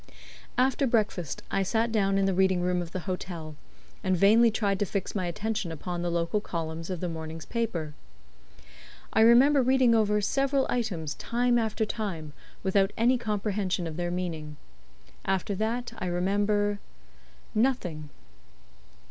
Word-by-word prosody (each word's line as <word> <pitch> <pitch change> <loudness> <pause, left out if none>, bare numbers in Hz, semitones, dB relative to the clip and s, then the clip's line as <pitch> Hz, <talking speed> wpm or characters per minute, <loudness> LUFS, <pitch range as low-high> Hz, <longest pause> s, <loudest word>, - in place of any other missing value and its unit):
After 265 +2 +2
breakfast 210 - -1
I 195 - +1
sat 225 +4 0
down 195 -3 +2
in 195 - +2
the 195 - +2
reading 190 -1 +3
room 180 0 +1
of 170 -1 -7
the 185 - -4
hotel, 170 -3 -5 0.5
and 185 -1 +2
vainly 220 +6 +6
tried 205 -3 0
to 205 - +1
fix 200 0 -3
my 185 -4 -1
attention 210 0 -2
upon 175 +2 -4
the 175 - -1
local 170 +4 0
columns 165 -3 -4
of 180 -3 -4
the 180 - -1
morning's 160 -1 -6
paper. 180 -10 -2 1.2
I 220 - +4
remember 260 +5 +6
reading 255 -1 +4
over 210 -2 +3
several 270 +5 +1
items 180 -11 -2
time 240 +6 +1
after 220 -1 0
time, 185 -9 -4 0.3
without 195 +1 +2
any 245 +2 +3
comprehension 205 -4 -1
of 160 -2 -5
their 175 +1 -2
meaning. 165 -4 -4 0.7
After 195 +1 -1
that 225 +5 -2
I 185 - -3
remember 205 +3 +1 0.7
nothing. 195 - 0
195 Hz, 150 wpm, -28 LUFS, 175-225 Hz, 1.2 s, vainly